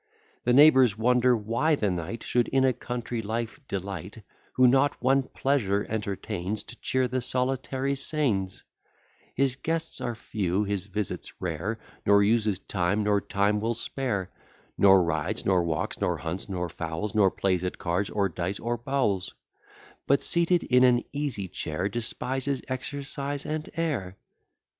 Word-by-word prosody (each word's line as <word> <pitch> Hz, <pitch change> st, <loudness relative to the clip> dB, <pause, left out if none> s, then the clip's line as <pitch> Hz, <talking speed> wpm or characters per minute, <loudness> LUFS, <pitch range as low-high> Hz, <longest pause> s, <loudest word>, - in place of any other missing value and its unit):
The 125 Hz, -, +3 dB
neighbours 130 Hz, -6 st, +7 dB
wonder 125 Hz, +2 st, +3 dB
why 115 Hz, +9 st, +1 dB
the 105 Hz, -8 st, 0 dB
knight 90 Hz, +6 st, -4 dB
Should 120 Hz, -1 st, +1 dB
in 135 Hz, 0 st, +2 dB
a 130 Hz, -, +3 dB
country 120 Hz, 0 st, -4 dB
life 115 Hz, +4 st, -3 dB
delight, 100 Hz, +2 st, -5 dB, 0.3 s
Who 130 Hz, 0 st, +5 dB
not 135 Hz, +3 st, +3 dB
one 135 Hz, +2 st, +3 dB
pleasure 115 Hz, -7 st, 0 dB
entertains 100 Hz, -1 st, -3 dB
To 125 Hz, -, -11 dB
cheer 130 Hz, -1 st, +1 dB
the 130 Hz, +1 st, -2 dB
solitary 130 Hz, +2 st, -1 dB
scenes: 130 Hz, -10 st, -1 dB, 0.7 s
His 135 Hz, -2 st, +2 dB
guests 165 Hz, +3 st, -3 dB
are 120 Hz, -1 st, -2 dB
few, 100 Hz, -3 st, -1 dB
his 100 Hz, -1 st, -2 dB
visits 105 Hz, 0 st, -4 dB
rare; 90 Hz, +6 st, -3 dB, 0.3 s
Nor 100 Hz, 0 st, +5 dB
uses 110 Hz, -2 st, +2 dB
time, 95 Hz, +2 st, -1 dB
nor 105 Hz, -1 st, +2 dB
time 100 Hz, +2 st, +1 dB
will 115 Hz, +2 st, 0 dB
spare; 110 Hz, -6 st, -3 dB, 0.4 s
Nor 95 Hz, -2 st, +6 dB
rides, 85 Hz, +5 st, -2 dB
nor 95 Hz, -2 st, +3 dB
walks, 80 Hz, -3 st, -2 dB
nor -, -, +1 dB
hunts, 85 Hz, +5 st, -5 dB
nor 90 Hz, -2 st, -2 dB
fowls, 85 Hz, +4 st, -4 dB
Nor 100 Hz, -3 st, +5 dB
plays 95 Hz, -1 st, 0 dB
at 90 Hz, -, -3 dB
cards, 90 Hz, +3 st, -1 dB
or 100 Hz, -2 st, +1 dB
dice, 90 Hz, +2 st, -3 dB
or 120 Hz, +1 st, -2 dB
bowls; 120 Hz, -6 st, -1 dB, 0.7 s
But 140 Hz, -, +3 dB
seated 170 Hz, 0 st, +2 dB
in 125 Hz, 0 st, +4 dB
an 125 Hz, -1 st, +5 dB
easy 140 Hz, -9 st, -2 dB
chair, 85 Hz, +2 st, -3 dB
Despises 130 Hz, +4 st, -2 dB
exercise 140 Hz, +1 st, -4 dB
and 155 Hz, 0 st, -3 dB
air. 125 Hz, -, -2 dB
110 Hz, 150 wpm, -27 LUFS, 95-130 Hz, 0.7 s, neighbours